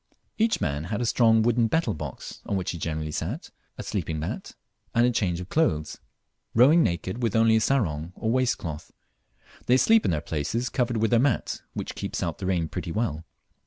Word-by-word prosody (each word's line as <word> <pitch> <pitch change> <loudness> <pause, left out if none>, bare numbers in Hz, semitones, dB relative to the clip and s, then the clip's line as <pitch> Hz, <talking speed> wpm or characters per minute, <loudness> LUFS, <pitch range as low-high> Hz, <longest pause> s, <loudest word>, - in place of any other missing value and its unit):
Each 225 +1 +2
man 75 +1 -2
had 105 +4 -3
a 120 - 0
strong 115 -1 +4
wooden 120 0 +3
"betel" 160 +8 +1
box, 75 - -7
on 100 - -1
which 90 - -2
he 85 - -6
generally 80 -1 -3
sat, - - -4 0.3
a - - -5
sleeping 80 - -3
mat, 75 - -5 0.4
and 120 +1 +5
a 125 - +3
change 90 -7 0
of 90 0 -7
clothes 80 - 0 0.6
rowing 140 +9 +6
naked, 95 - -1
with 115 -3 0
only 115 0 +5
a - - +1
sarong 85 - 0
or 110 - -2
a - - +2
waistcloth. 120 -12 -1 0.8
They 125 - +5
sleep 220 - +5
in - - +1
their 80 -4 +1
places, 85 - -2
covered 120 -2 0
with 110 +1 +1
their 120 - +5
mat, 130 -2 0
which - - -5
keeps - - -4
out 85 -2 -3
the 95 - -3
rain 90 -4 +1
pretty 85 - -5
well. 85 -6 -2
110 Hz, 200 wpm, -26 LUFS, 80-120 Hz, 0.8 s, rowing